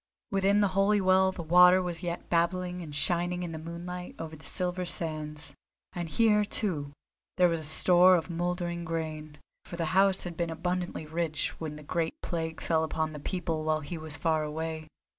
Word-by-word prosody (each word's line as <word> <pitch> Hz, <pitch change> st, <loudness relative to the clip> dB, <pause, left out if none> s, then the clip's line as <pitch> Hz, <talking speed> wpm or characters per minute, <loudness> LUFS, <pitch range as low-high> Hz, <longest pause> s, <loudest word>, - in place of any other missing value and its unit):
Within 195 Hz, +1 st, +3 dB
the 200 Hz, -, +3 dB
holy 195 Hz, +2 st, +3 dB
well 190 Hz, 0 st, +4 dB
the 175 Hz, -, -7 dB
water 180 Hz, +3 st, +7 dB
was 175 Hz, -2 st, -2 dB
yet 175 Hz, -1 st, -4 dB
babbling 180 Hz, +1 st, 0 dB
and 150 Hz, -4 st, -8 dB
shining 175 Hz, +4 st, 0 dB
in 175 Hz, -, -4 dB
the 160 Hz, -, -6 dB
moonlight 175 Hz, +2 st, -7 dB
over 160 Hz, -1 st, -6 dB
the 155 Hz, -, -15 dB
silver 180 Hz, -1 st, 0 dB
sands; 155 Hz, -3 st, -3 dB, 0.4 s
and 175 Hz, -2 st, -4 dB
here, 210 Hz, +4 st, +3 dB
too, 165 Hz, -9 st, -2 dB, 0.5 s
there 180 Hz, -1 st, +6 dB
was 165 Hz, -3 st, -1 dB
store 180 Hz, +3 st, +6 dB
of 165 Hz, -2 st, -1 dB
mouldering 175 Hz, 0 st, -2 dB
grain, 155 Hz, -2 st, -4 dB, 0.3 s
for -, -, -8 dB
the 165 Hz, -, -1 dB
house 195 Hz, 0 st, +4 dB
had 175 Hz, -2 st, -6 dB
been 170 Hz, 0 st, -1 dB
abundantly 175 Hz, 0 st, -3 dB
rich 160 Hz, -1 st, -2 dB
when 155 Hz, -2 st, -5 dB
the 150 Hz, -, -10 dB
great 165 Hz, +2 st, -2 dB
plague 160 Hz, -2 st, -3 dB
fell 160 Hz, -1 st, +1 dB
upon 160 Hz, 0 st, -2 dB
the 150 Hz, -, -7 dB
people 165 Hz, -1 st, -3 dB
while 155 Hz, 0 st, +1 dB
he 155 Hz, +4 st, -6 dB
was 155 Hz, -1 st, -6 dB
far 160 Hz, -2 st, +1 dB
away. 160 Hz, +1 st, -4 dB
170 Hz, 185 wpm, -29 LUFS, 160-180 Hz, 0.5 s, water